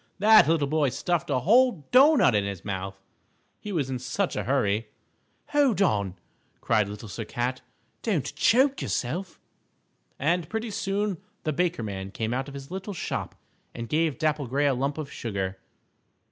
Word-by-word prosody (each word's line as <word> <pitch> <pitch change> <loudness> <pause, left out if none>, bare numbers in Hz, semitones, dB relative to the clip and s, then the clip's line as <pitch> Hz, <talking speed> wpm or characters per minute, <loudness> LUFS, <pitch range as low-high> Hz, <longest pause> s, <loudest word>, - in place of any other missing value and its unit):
that 215 -4 +7
little 160 -3 +2
boy 150 -1 +2
stuffed 175 +6 -1
a 130 -3 +1
whole 230 - +4
doughnut 270 - +6
into 100 -1 +1
his 95 -2 -8
mouth, 95 -1 -4 0.6
he 210 - -7
was 155 -8 0
in 130 -1 -3
such 180 +9 -2
a - - -2
hurry. 115 -5 +1 0.6
"Hold 280 -8 +3
on!" 100 - +1 0.4
cried 105 -3 +1
Little 105 +2 -8
Sir 115 +3 -5
Cat, 120 +4 -3 0.4
"don't 190 - -1
choke 265 +4 +3
yourself!" 165 +8 -3 0.8
And 165 +3 0
pretty 220 0 -3
soon 200 -2 -1 0.2
the 155 - -1
Baker 170 -4 0
Man 95 -2 -5
came 110 +3 -3
out 130 +2 -2
of 140 - -9
his 140 +3 -9
little 190 +1 -5
shop - - -4 0.4
and 115 -1 -5
gave 155 +1 +1
Dapple 155 -3 0
Gray 140 +4 +1
a 140 - +3
lump 140 +3 -1
of 155 -3 -5
sugar. 95 -4 -4
145 Hz, 165 wpm, -26 LUFS, 115-190 Hz, 0.8 s, that